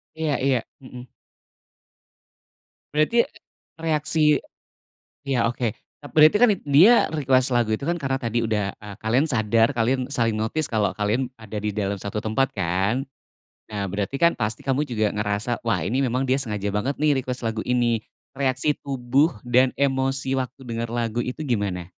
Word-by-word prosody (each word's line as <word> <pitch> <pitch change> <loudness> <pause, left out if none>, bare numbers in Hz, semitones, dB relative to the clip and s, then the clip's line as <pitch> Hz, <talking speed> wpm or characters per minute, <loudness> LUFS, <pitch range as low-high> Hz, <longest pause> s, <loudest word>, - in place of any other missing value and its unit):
Iya 160 -2 -1
iya, 135 -2 +3 0.2
hmm. 125 -1 -10 1.9
Berarti, 155 +11 +3 0.6
reaksi 155 -1 +2 0.9
ya 125 -4 +1
oke. 120 -3 -2 0.4
Berarti 155 +5 +7
kan 245 0 +6
dia 165 +13 +5
request 135 -4 +2
lagu 120 -3 +2
itu 110 - -6
kan 170 +4 -1
karena 135 -2 -1
tadi 115 0 -1
udah, 105 -3 0
e 105 - -11
kalian 125 +8 +2
sadar, 115 -1 +2
kalian 125 +2 +1
saling 115 -6 0
notice, 130 +8 -1
kalo 110 -3 0
kalian 110 +5 0
ada 110 -1 -7
di 105 -1 -3
dalam 100 -1 -2
satu 105 +2 -4
tempat 125 +5 0
kan. 95 +7 0 0.7
Nah 100 -3 -3
berarti 100 +6 -2
kan 170 -5 +4
pasti 110 +4 -2
kamu 140 +2 0
juga 110 -4 0
ngerasa, 105 +3 -2
wah 90 -8 +1
ini 115 +10 -1
memang 130 +1 0
dia 130 +2 +2
sengaja 105 -6 -2
banget 115 +8 -1
nih 150 -2 +2
request 125 -1 -4
lagu 110 -1 -2
ini. 120 -2 +2 0.3
Reaksi 135 +2 0
tubuh 135 +1 +1
dan 125 +1 +3
emosi 135 -1 0
waktu 130 +1 -5
dengar 115 -1 -4
lagu 120 0 -2
itu 125 +6 -4
gimana? 100 -8 -2
125 Hz, 155 wpm, -23 LUFS, 110-135 Hz, 1.9 s, Berarti